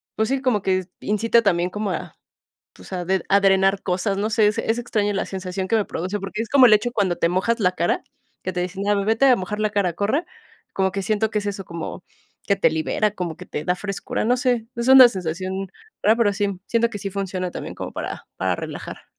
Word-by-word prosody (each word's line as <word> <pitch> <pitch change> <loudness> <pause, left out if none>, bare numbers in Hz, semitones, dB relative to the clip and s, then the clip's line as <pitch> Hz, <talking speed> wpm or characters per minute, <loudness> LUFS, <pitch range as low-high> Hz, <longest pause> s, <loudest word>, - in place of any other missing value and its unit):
pues, 220 0 0
sí, 270 0 0
como 240 -6 +2
que 185 -1 +1 0.2
incita 225 +3 +2
también 180 -3 +2
como 210 +1 -3
a, - - -5 0.6
o - - -12
sea, 180 -2 -5
de 190 +1 0
a 200 - +5
drenar 195 0 +3
cosas, 190 +2 -1
no 210 +2 0
sé, 220 -1 +3
es 210 - 0
es 225 - 0
extraño 210 -3 -1
la 195 - -1
sensación 190 0 -4
que 225 - +3
me 210 - 0
produce, 185 +5 -3
porque, 195 +3 -4
es 225 - -5
como 275 -2 +7
el 215 - +6
hecho 225 +3 +2
cuando 195 -6 +1
te 170 - +2
mojas 195 +7 0
la 180 -2 +3
cara, 175 -1 0 0.4
que 185 - -2
te 180 - -2
dicen, 185 +2 -4
ah, 205 - +4
vete 225 +5 +3
a 250 -2 +6
mojar 200 +3 -4
la 215 - +2
cara, 200 -4 +1
corre, 215 - 0 0.5
como 190 -1 +1
que 195 - -3
siento 215 +2 0
que 210 - 0
es 205 - -7
eso, 195 -1 -4
como 170 +2 -6 0.4
que 200 - +3
te - - +4
libera, 160 +7 0
como 180 -5 -5
que - - -10
te 150 - -4
da 180 - +2
frescura, 195 0 -3
no 245 +3 +3
sé, 245 -3 0
es 235 +1 -2
una 260 -2 +10
sensación 185 0 -4 0.4
rara, 215 +2 +5
pero 225 -4 +3
sí, 200 -2 -2
siento 235 0 +2
que 205 - -6
sí 200 - -4
funciona 185 -2 -3
también - - -6
como - - -6
para - - -6
para - - 0
relajar. - - -7
200 Hz, 240 wpm, -22 LUFS, 185-220 Hz, 0.6 s, una